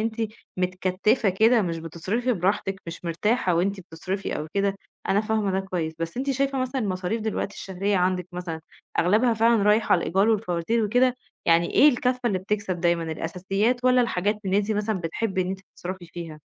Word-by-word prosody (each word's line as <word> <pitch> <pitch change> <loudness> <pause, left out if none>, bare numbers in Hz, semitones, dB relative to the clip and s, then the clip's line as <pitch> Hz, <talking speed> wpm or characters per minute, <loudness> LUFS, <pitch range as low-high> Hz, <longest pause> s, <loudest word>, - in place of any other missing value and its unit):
أنتِ 225 -1 -2 0.2
متكتّفة 185 +4 +1
كده 220 +5 +4
مش 170 -3 -2
بتصرفي 185 +10 -2
براحتِك، 195 0 -1
مش 170 +1 -8
مرتاحة 180 +3 +1
وأنتِ 190 +3 0
بتصرفي 185 +3 -4
أو 150 - -4
كده، 200 0 +1 0.3
أنا 200 +2 +3
فاهمة 215 -2 0
ده 190 - +1
كويس. 180 -4 -3
بس 165 +3 -4
أنتِ 270 +2 -1
شايفة 275 0 0
مثلًا 255 +1 -1
المصاريف 195 +1 -2
دلوقتي 215 -2 -2
الشهرية 195 +1 -2
عندِك 180 0 +1
مثلًا 175 -2 -5 0.4
أغلبها 220 +7 +3
فعلًا 225 -1 +3
رايح 210 +2 +3
على - - +5
الإيجار 195 +5 +2
والفواتير 215 +1 +1
وكده؟ 245 +4 +3 0.3
يعني 170 0 +4
إيه 300 - +8
الكفّة 250 -1 +1
اللي 195 -5 +1
بتكسب 190 -2 -2
دايمًا، 170 -1 +2
الأساسيات، 195 +10 -1
والّا 255 0 +5
الحاجات 210 -2 0
اللي 190 +1 +1
أنتِ 205 +1 -1
مثلًا 210 -2 -1
بتحبي 185 +3 -1
إن 180 - -4
أنتِ 190 0 -4
بتصرفي 180 0 -6
فيها؟ 165 -3 -8
195 Hz, 180 wpm, -25 LUFS, 180-220 Hz, 0.4 s, إيه